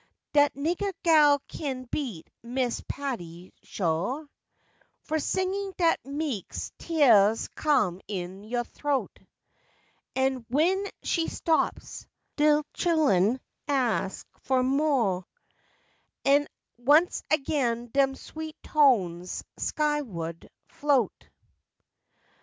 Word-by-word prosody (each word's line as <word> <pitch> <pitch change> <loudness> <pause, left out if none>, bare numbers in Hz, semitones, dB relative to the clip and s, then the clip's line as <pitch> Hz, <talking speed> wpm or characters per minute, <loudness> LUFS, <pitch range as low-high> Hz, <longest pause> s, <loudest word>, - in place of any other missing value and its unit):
Dat 290 -1 +5
niggah 345 +7 -1
gal 300 -4 +6
kin 265 -4 -4
beat 235 - -4
Miss 245 0 -2
Patti, 180 -11 -6
sho\ 195 - -2 0.8
Fo' 315 - -1
singin' 380 +4 -1
dat 335 -2 +3
meks 280 - -4
teahs 225 -10 +4
come 215 - +1
in 190 -1 -5
yo' 240 +3 -2
throat, 285 +2 -3 1.0
An' 265 -1 +1
w'en 360 +9 +2 0.2
she 330 -2 0
stops, 320 -1 -1 0.3
de 300 0 +4
chillun 260 - +2 0.3
ax 240 -10 0
fo' 260 -1 +1
mo', 260 -9 +1 1.0
An' 285 +1 +4 0.3
once 295 +8 +4
again 270 -6 0
dem 270 -1 +3
sweet 315 +3 -8
tones 190 - +2 0.2
sky 300 -1 0
wa'd 170 - -6 0.2
float. 280 -7 0
275 Hz, 95 wpm, -27 LUFS, 220-305 Hz, 1.0 s, gal